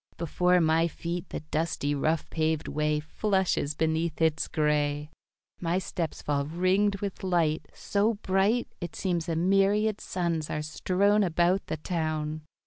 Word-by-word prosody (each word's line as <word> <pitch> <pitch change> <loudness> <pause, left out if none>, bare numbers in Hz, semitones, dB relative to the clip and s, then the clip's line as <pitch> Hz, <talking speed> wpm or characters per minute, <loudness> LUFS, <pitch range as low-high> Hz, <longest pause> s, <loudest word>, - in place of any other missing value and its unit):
Before 180 +2 +2
my 165 0 +3
feet 170 +2 -5
the - - -5
dusty, 155 -1 -1
rough 155 +3 0
paved 160 -1 0
way 150 0 0
Flushes 185 -2 0
beneath 160 +1 0
its 160 -1 +2
gray. 150 -1 0 0.5
My 170 +1 0
steps 175 -3 -3
fall 140 -1 0
ringed 185 +4 +1
with 200 -2 -4
light, 170 -4 +1
So 210 +3 +1
bright, 200 +4 +1
It 175 - -5
seems 175 -3 -1
a 165 - 0
myriad 195 +4 +2
suns 170 -4 -2
are 150 - -2
strown 195 +6 +2
About 175 +2 +1
the 155 - -3
town. 155 -1 -2
170 Hz, 140 wpm, -28 LUFS, 155-190 Hz, 0.5 s, my